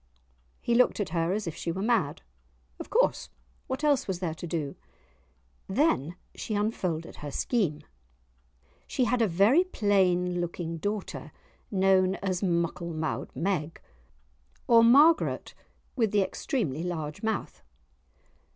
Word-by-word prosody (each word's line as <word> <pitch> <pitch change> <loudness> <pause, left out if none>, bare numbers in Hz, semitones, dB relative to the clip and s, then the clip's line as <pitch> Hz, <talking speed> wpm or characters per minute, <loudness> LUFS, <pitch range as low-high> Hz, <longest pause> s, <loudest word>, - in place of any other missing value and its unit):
He 235 - 0
looked 245 -1 +3
at 205 - -1
her 165 +1 0
as 210 +1 -1
if 165 - -4
she 170 - -3
were 190 +4 -3
mad; 235 +1 0 0.6
of - - -7
course, - - +1 0.4
what 260 +2 -4
else 290 -4 +2
was 190 -2 -2
there 175 -3 -3
to 170 +2 -7
do? 155 -4 -3 0.9
Then 190 - +1 0.2
she 215 - -4
unfolded 185 -6 -2
her 150 - -6
scheme. 155 - -1 1.0
She 255 - 0
had 240 +1 +1
a 225 - +4
very 205 - +4
plain 185 - +1
looking 170 -1 -4
daughter 205 +4 -4 0.4
known 190 -1 +3
as 185 -2 -2
"Muckle 170 -2 -1
mou'd 155 0 -3
Meg," 165 -4 -2 0.9
or 230 -1 +7
Margaret 290 +8 +4 0.4
with 230 -5 +2
the 205 0 +3
extremely 185 - -2
large 160 -4 -4
mouth. 220 -2 -3
190 Hz, 135 wpm, -28 LUFS, 170-225 Hz, 1.0 s, or